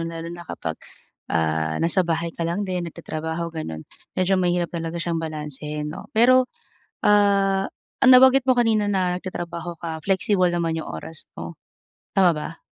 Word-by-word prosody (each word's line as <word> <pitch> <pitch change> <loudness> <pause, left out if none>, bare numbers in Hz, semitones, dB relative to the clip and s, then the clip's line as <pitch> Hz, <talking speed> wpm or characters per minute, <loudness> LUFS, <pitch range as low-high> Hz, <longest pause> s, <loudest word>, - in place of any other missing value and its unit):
lalo 165 0 -6
na 175 - -8
kapag, 80 - -5 0.5
ah, 80 -1 0
nasa 170 +3 +2
bahay 165 0 -1
ka - - -11
lang 190 +5 -1
din 180 -2 -2
nagtatrabaho 160 +1 -5
gano'n, 80 - -5 0.3
medyo 185 +1 +2
mahirap 175 -1 0
talaga 165 0 -4
siyang 170 -1 -1
balansehin 150 -1 -5
'no? - - -9
Pero, 255 +2 +5 0.6
ah, 200 -2 +4 0.4
nabanggit 260 0 +7
mo 255 - +5
kanina 220 -3 +2
na 185 -2 +1
nagtatrabaho 175 -2 -5
ka, 160 -2 -5
flexible 195 -1 +2
naman 165 -1 0
yung - - -8
oras 160 0 -8
mo, - - -7 0.6
tama 185 -3 +5
ba? 155 +2 -6
170 Hz, 150 wpm, -23 LUFS, 160-195 Hz, 0.6 s, nabanggit